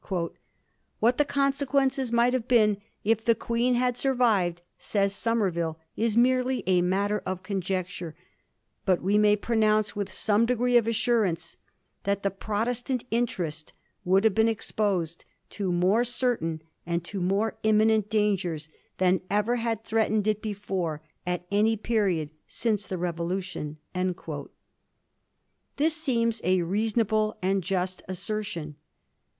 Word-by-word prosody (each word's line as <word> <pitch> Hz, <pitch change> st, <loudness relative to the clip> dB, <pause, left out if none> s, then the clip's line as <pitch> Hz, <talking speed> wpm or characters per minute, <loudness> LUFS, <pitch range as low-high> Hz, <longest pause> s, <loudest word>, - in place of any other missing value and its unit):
* 175 Hz, -4 st, -8 dB
What 240 Hz, +4 st, +3 dB
the 295 Hz, -, +5 dB
consequence 275 Hz, -2 st, +1 dB
might 235 Hz, +1 st, +3 dB
have 250 Hz, -2 st, -1 dB
been, 215 Hz, -5 st, +4 dB, 0.3 s
if 225 Hz, +1 st, +2 dB
the 230 Hz, 0 st, +4 dB
Queen 235 Hz, +3 st, 0 dB
had 250 Hz, 0 st, +1 dB
survived,' 225 Hz, -10 st, +1 dB, 0.2 s
says 200 Hz, -1 st, 0 dB
Somerville, 185 Hz, -8 st, 0 dB
* -, -, -52 dB
is 225 Hz, 0 st, 0 dB
merely 255 Hz, +1 st, +3 dB
a 185 Hz, -1 st, +3 dB
matter 200 Hz, +3 st, +1 dB
of 185 Hz, 0 st, -4 dB
conjecture; 185 Hz, -3 st, -3 dB, 0.7 s
but 185 Hz, -3 st, +1 dB
we 200 Hz, +3 st, +3 dB
may 210 Hz, 0 st, +5 dB
pronoimce, 215 Hz, -1 st, +1 dB
with 200 Hz, -2 st, -3 dB
some 210 Hz, +4 st, +2 dB
degree 245 Hz, 0 st, +1 dB
of 235 Hz, -2 st, +5 dB
assurance, 210 Hz, -7 st, 0 dB, 0.5 s
that 200 Hz, 0 st, -1 dB
the 195 Hz, -, +1 dB
Protestant 230 Hz, +5 st, -2 dB
interest 175 Hz, -10 st, -2 dB, 0.3 s
would 190 Hz, +3 st, +3 dB
have 220 Hz, -3 st, +4 dB
been 220 Hz, +2 st, +3 dB
exposed 200 Hz, -6 st, -1 dB, 0.3 s
to 195 Hz, -3 st, -2 dB
more 185 Hz, +7 st, +3 dB
certain 230 Hz, -11 st, -1 dB, 0.2 s
and 170 Hz, 0 st, -2 dB
to 195 Hz, +1 st, -4 dB
more 200 Hz, +5 st, 0 dB
imminent 215 Hz, -1 st, +3 dB
dangers 190 Hz, -8 st, 0 dB, 0.3 s
than 185 Hz, 0 st, +3 dB
ever 210 Hz, +4 st, +1 dB
had 225 Hz, -2 st, -2 dB
threatened 220 Hz, -2 st, +1 dB
it 215 Hz, -1 st, +1 dB
before 190 Hz, -7 st, -3 dB, 0.2 s
at 180 Hz, 0 st, -2 dB
any 215 Hz, +2 st, +3 dB
period 195 Hz, -9 st, 0 dB, 0.2 s
since 210 Hz, -3 st, -1 dB
the 185 Hz, -, -3 dB
Revolution.' 175 Hz, -2 st, -3 dB, 2.0 s
This 310 Hz, +2 st, +2 dB
seems 235 Hz, -8 st, 0 dB
a 185 Hz, -1 st, +2 dB
reason 215 Hz, +6 st, +1 dB
able 215 Hz, 0 st, 0 dB
and 190 Hz, 0 st, +1 dB
just 185 Hz, 0 st, -2 dB
assertion. 185 Hz, -5 st, -4 dB
210 Hz, 135 wpm, -27 LUFS, 185-230 Hz, 2.0 s, the